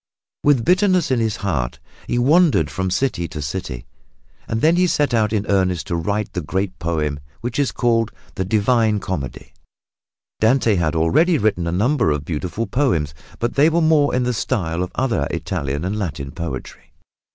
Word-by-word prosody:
With 140 -6 +3
bitterness 185 -4 +3
in 130 - +2
his 110 -2 0
heart 65 -11 -1 0.3
he 120 - 0
wandered 140 - +4
from 95 0 -2
city 90 -3 0
to 80 - -7
city, 75 -4 -5 0.6
and 110 - -1
then 160 +2 +4
he 180 +1 +3
set 145 -6 +1
out 110 -2 +2
in 105 -2 0
earnest 95 -3 +1
to 85 - -2
write 100 +5 -2
the 90 - -2
great 95 +4 -3
poem 75 -3 -1 0.2
which 120 +2 -3
is 140 - +1
called 115 -2 +1 0.2
the 95 - -2
Divine 110 +2 +2
Comedy. 75 -10 -5 0.9
Dante 115 0 +3
had 85 -4 0
already 115 - +3
written 100 -8 0
a - - 0
number 110 - +2
of 75 -1 -1
beautiful 90 +7 -3
poems, 95 - 0 0.2
but 120 - -2
they 145 +3 +5
were 165 +1 +1
more 155 -4 +3
in 125 - +1
the 125 0 0
style 85 -6 -1
of 90 - -2
other 130 -2 0
Italian 70 +4 -3
and 105 +3 -2
Latin 75 -8 -4
poetry. 80 -4 -7
100 Hz, 175 wpm, -20 LUFS, 85-125 Hz, 0.9 s, they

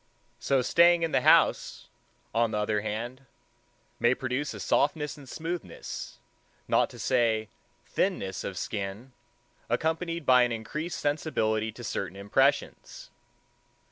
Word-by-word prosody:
So 135 -2 +1
staying 170 +5 +5
in 165 - 0
the - - +2
house, - - +3 0.5
on 115 +1 +2
the 105 - -2
other 105 0 0
hand, 120 +5 -5 0.7
may 120 +2 +3
produce 135 +4 -2
a - - -8
softness 150 +1 +1
and 140 -4 -13
smoothness, 165 +4 -6 0.5
not - - +3
to - - -12
say 115 -4 +1 0.4
thinness 120 - -1
of 95 - -5
skin, 100 +6 -4 0.6
accompanied 165 0 -1
by 125 -1 +6
an 120 0 +2
increased 150 +10 -4
sensibility 110 -8 0
to 120 - -10
certain 100 -3 -4
impressions. 100 +1 0
125 Hz, 125 wpm, -28 LUFS, 110-150 Hz, 0.7 s, by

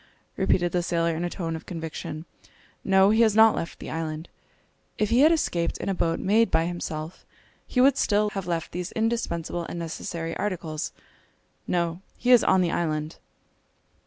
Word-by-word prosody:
repeated 175 -1 +1
the 180 - +1
sailor, 170 -1 0
in 165 - -3
a 175 - -1
tone 165 -3 -4
of 160 - -9
conviction, 160 -1 -6 0.6
"no, 195 +1 +5
he 220 +2 +4
has 220 -3 +4
not 220 0 +7
left 165 - -4
the - - -8
island! 160 0 -4 0.7
If 210 0 0
he 235 - +4
had 305 +4 +7
escaped 175 - 0
in - - -4
a - - +1
boat 165 -2 0
made 220 +4 +3
by 160 0 +2
himself, 165 -2 -5 0.4
he 250 - -1
would 275 +1 +5
still 205 -4 +2
less 210 - -2
have 195 -3 -4
left 170 -2 -2
these 180 0 -4
indispensable 220 -7 -1
and - - -5
necessary 165 0 -4
articles. 170 -6 -3 0.8
No! 170 0 -1 0.2
he 250 - +1
is 245 -2 +7
on 190 0 +4
the 175 -2 +1
island!" 155 -2 -2
175 Hz, 180 wpm, -26 LUFS, 165-210 Hz, 0.8 s, not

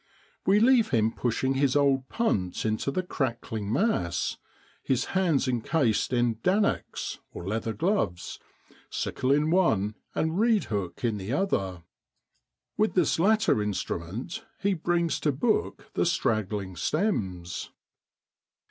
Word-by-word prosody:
We 200 +2 +5
leave 240 0 +5
him 115 -3 +2
pushing 125 +3 0
his 135 0 +2
old 135 -2 +2
punt 100 - -1
into 110 +5 0
the 185 +7 -1
crackling 115 - -3
mass, 115 - 0 0.5
hands 150 +2 +1
encased 125 -1 +1
in 120 -1 +3
l 115 - -2
dannocks 200 - 0
' - - -44
(leather 110 +5 -3
gloves), 160 - -1 0.5
sickle 130 +1 -1
in 150 +3 +3
one, 110 - +2 0.2
and 160 +4 0
reedhook 130 - 0
in 115 -3 +1
the 100 +3 -5
other. 95 - -1 0.9
With 215 +1 +1
this 175 -3 +2
latter 215 - +3
instrument 105 - -4 0.2
he 200 0 +1
brings 170 -2 0
to 150 - +1
book 210 - -1
the - - +1
straggling 105 - -1
stems. 95 - -1
135 Hz, 120 wpm, -27 LUFS, -, 0.9 s, We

